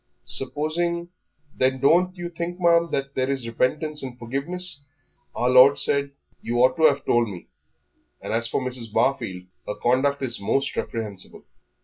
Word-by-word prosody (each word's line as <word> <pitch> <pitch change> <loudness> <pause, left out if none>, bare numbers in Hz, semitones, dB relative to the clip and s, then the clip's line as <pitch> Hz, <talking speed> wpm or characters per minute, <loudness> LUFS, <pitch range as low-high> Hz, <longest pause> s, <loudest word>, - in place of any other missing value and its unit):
Supposing 170 +5 -2 0.2
" 145 -1 -37
"Then 130 0 +2
don't 180 +6 +3
you 175 0 -5
think, 170 +1 -5
ma'am, 170 -1 +4 0.2
there 130 0 -1
is 135 -4 -1
repentance 150 +6 -1
and 130 -2 -7
forgiveness? 145 +7 -4 0.5
Our 125 +1 +1
Lord 130 +3 +7
said 140 0 +1
" - - -39
"You 120 +1 -2
ought 130 0 +4
to 160 - +4
have 145 -2 +3
told 120 -2 +2
me; 90 -3 -10 0.7
and - - -5
as 115 +1 +1
for 115 - -1
Mrs. 125 -3 -4
Barfield, 95 -7 0 0.2
her 105 - -3
conduct 135 +5 +1
is 120 -2 -1
most 135 +7 0
reprehensible." 105 -5 -3
135 Hz, 160 wpm, -24 LUFS, 120-160 Hz, 0.7 s, Lord